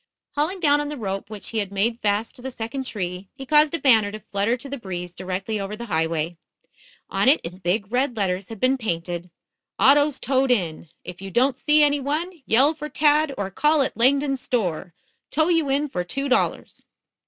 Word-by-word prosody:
Hauling 315 +7 -1
down 295 -3 +3
on 295 - -4
the 295 - -5
rope 195 -3 -4
which 210 -2 -7
he 225 - -2
had 200 -2 -3
made 225 +4 0
fast 210 +1 0
to - - -12
the 265 - -5
second 250 +2 -5
tree, 185 -3 -5
he 270 -1 -8
caused 300 +3 +4
a - - -3
banner 220 -7 +4
to 215 - -7
flutter 210 +3 -1
to 265 - -10
the 280 0 -6
breeze 180 -4 -6
directly 190 +4 -3
over 200 +1 -4
the 235 +2 -7
highway. 160 +1 -1 0.7
On - - +3
it 295 - +5
in 175 +2 -8
big 190 +3 -1
red 250 -1 0
letters 185 -2 -1
had 225 -3 -8
been 260 +3 +2
painted: 175 -4 -3 0.5
AUTOS 285 +1 +5
TOWED 265 0 +1
IN. 175 -9 0
IF 180 +1 -9
YOU 195 - -6
DON'T 250 +5 +2
SEE 300 +3 +4
ANY 290 0 +3
ONE, 315 +5 -3
YELL 270 +7 +4
FOR 300 -1 -7
TAD 300 -1 +2
OR 195 -1 -3
CALL 300 +6 +3
AT - - -3
LANGDON'S 275 +2 +2
STORE. 180 -7 -2 0.3
TOW 315 +3 +1
YOU 330 -5 +2
IN 285 +2 +1
FOR 180 -10 -3
TWO 275 +10 -3
DOLLARS. 260 - 0
235 Hz, 205 wpm, -23 LUFS, 195-285 Hz, 0.7 s, it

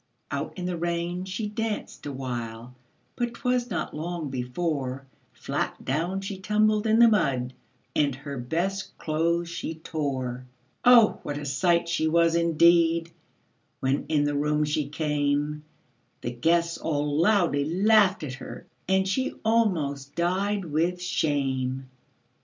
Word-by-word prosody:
Out - - -4
in 180 - -4
the 180 -1 -2
rain 175 +1 -2
she 190 +3 -3
danced 215 -6 -4
awhile, 120 -3 -5 0.4
But 240 -1 -2
'twas 250 -1 0
not 185 - -3
long 160 -2 -4
before 135 +1 -3 0.3
Flat - - -4
down 170 +8 -1
she 195 0 -5
tumbled 215 +2 +2
in 220 +1 +4
the 235 0 +8
mud, 135 - +1 0.4
And 140 -3 +2
her 140 0 -6
best 175 +10 -2
clothes 170 +2 0
she 170 -1 -5
tore. 130 -6 -3 0.4
Oh! 240 -3 +6
what 145 0 -4
a 145 - -5
sight 170 +4 +2
she 170 -2 +1
was, 165 +1 +3
indeed, 170 0 +4 0.7
When 135 +1 0
in 150 -2 +3
the 145 0 0
room 150 +1 +1
she 150 -1 -1
came; 150 0 -1 0.6
The 120 - -3
guests 170 +7 +1
all 145 -1 -1
loudly 175 -7 +3
laughed 195 +3 +3
at 135 -4 -4
her, 130 - -9 0.2
And 190 0 +3
she 260 +8 -1
almost 155 -12 +1
died 190 +3 0
with 170 +3 0
shame. 135 -6 -1
165 Hz, 135 wpm, -26 LUFS, 145-185 Hz, 0.7 s, the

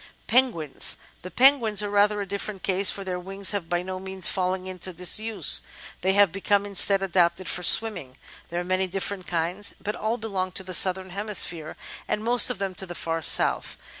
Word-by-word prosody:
Penguins 225 - +2 0.2
The 185 - -9
Penguins 230 -1 +4
are 205 - -3
rather 205 0 +2
a - - -4
different 200 0 -5
case, 195 0 +2
for 200 - -4
their 180 -1 -4
wings 195 +2 -3
have 200 -5 -4
by 175 0 -1
no 185 0 -6
means 190 -1 -4
fallen 185 0 -1
into 185 0 -6
disuse; 210 +6 +2 0.4
they 190 - +1
have 200 -3 +4
become, 200 +2 0
instead, 200 0 +3
adapted 180 -1 0
for 180 - -3
swimming. 180 - +3 0.3
There 170 - -3
are - - -3
many 185 +1 -1
different 190 0 -4
kinds, 175 +4 -2
but 210 - -5
all 220 +3 -2
belong 195 -5 -4
to 190 - -2
the 185 0 -6
Southern 185 +1 +3
Hemisphere, 185 -5 -3 0.3
and 210 - -2
most 240 +1 +5
of - - -3
them 195 -1 -4
to 190 - -8
the 175 - -8
far 165 -1 -3
south. - - +1
190 Hz, 195 wpm, -24 LUFS, 180-205 Hz, 0.4 s, most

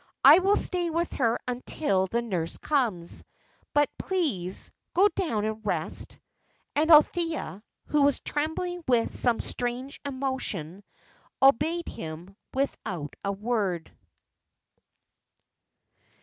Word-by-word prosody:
"I - - +10
will 390 +2 +3
stay 355 -2 0
with 335 +1 -1
her 235 -3 +2
until 245 -5 0
the 235 +5 -1
nurse 180 -8 -2
comes. 225 - 0 0.5
But 290 -1 +4
please, 255 - -2 0.2
go 390 +3 +6
down 235 - -1
and 220 0 -3
rest." - - -3 0.6
And 310 +2 +2
Althea, 320 - +4 0.2
who 300 - +1
was 280 0 +4
trembling 335 +4 -3
with 240 -3 +2
some 240 -2 +2
strange 245 +3 -3
emotion, 260 - -3 0.6
obeyed 305 +6 +3
him 165 +4 -7 0.2
without 190 - -3
a 200 - 0
word. 200 -5 -2
250 Hz, 105 wpm, -27 LUFS, 200-310 Hz, 0.6 s, I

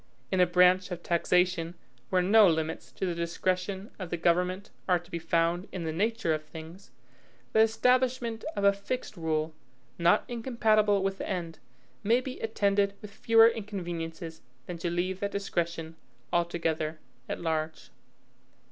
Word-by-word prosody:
In 190 - +1
a 180 - +6
branch 180 +1 +4
of 175 -2 -6
taxation 175 0 +1 0.3
where 185 -1 +2
no 210 +2 +7
limits 160 -1 -1
to - - -3
the 180 - -1
discretion 185 +4 -2
of 185 -3 -5
the 175 - -2
government 180 +3 +1 0.2
are 180 - +5
to 175 +1 -14
be 170 - -3
found 165 +2 0
in 180 - -4
the 160 - -2
nature 200 -1 0
of 155 0 -3
things, 160 +4 -11 0.6
the - - +4
establishment 240 +1 +2
of 200 - -2
a 200 0 +6
fixed 210 +3 -5
rule, 160 -2 -1 0.5
not 170 +1 +4
incompatible 220 -4 +2
with 195 0 -1
the - - -4
end, 170 -4 -4 0.4
may 230 +4 +4
be 255 0 -7
attended 200 -2 +1
with 210 -2 -10
fewer 225 +1 +6
inconveniences 175 -7 -4 0.2
than 175 -1 -6
to 175 - -1
leave 180 +2 -1
that 200 - -1
discretion 170 -5 -3 0.4
altogether 165 -2 0 0.3
at - - -3
large. 160 -1 -3
180 Hz, 155 wpm, -29 LUFS, 170-200 Hz, 0.6 s, no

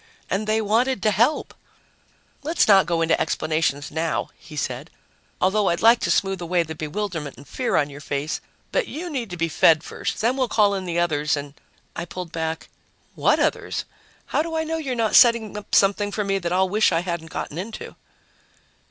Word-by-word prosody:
And 205 +3 -1
they 220 +1 +2
wanted 225 +2 +1
to 215 - +4
help! 235 - +1 0.9
"Let's 320 +4 +1
not 195 -3 +6
go 170 -2 +1
into 165 - +2
explanations 155 -2 -1
now," 160 +1 -1
he 155 - -13
said, 135 +1 -3 0.5
"although 200 +2 +2
I'd 170 - -1
like 230 +1 +7
to - - -1
smooth 195 -2 +1
away 175 0 +1
the 160 -1 -7
bewilderment 160 -2 -4
and 140 +2 -14
fear 255 - -1
on 145 - +3
your 145 +1 -10
face. 145 +1 -3 0.3
But - - 0
you 340 +3 -6
need 245 -7 -3
to 175 - -6
be 165 0 0
fed 160 0 +4
first. - - -4
Then 235 +5 +1
we'll 260 -2 +1
call 210 -3 +3
in 190 -1 -3
the 170 -1 -2
others 150 -4 +1
and 140 0 -6 0.2
" - - -37
I 170 - -4
pulled 175 -1 -7
back. 160 -1 -3 0.5
"What - - +2
others? - - -1 0.4
How - - 0
do 325 0 -4
I 320 - 0
know 325 +1 -2
you're 275 -6 -3
not 225 -2 0
setting 230 -4 +5
up 210 - -3
something 205 +1 +3
for 210 - -1
me 195 -1 0
that 170 -2 -3
I'll 190 +1 +3
wish 215 +3 +3
I 165 - +2
hadn't 170 -2 -4
gotten 160 - -5
into?" 215 +4 -7
190 Hz, 205 wpm, -23 LUFS, 160-220 Hz, 0.9 s, like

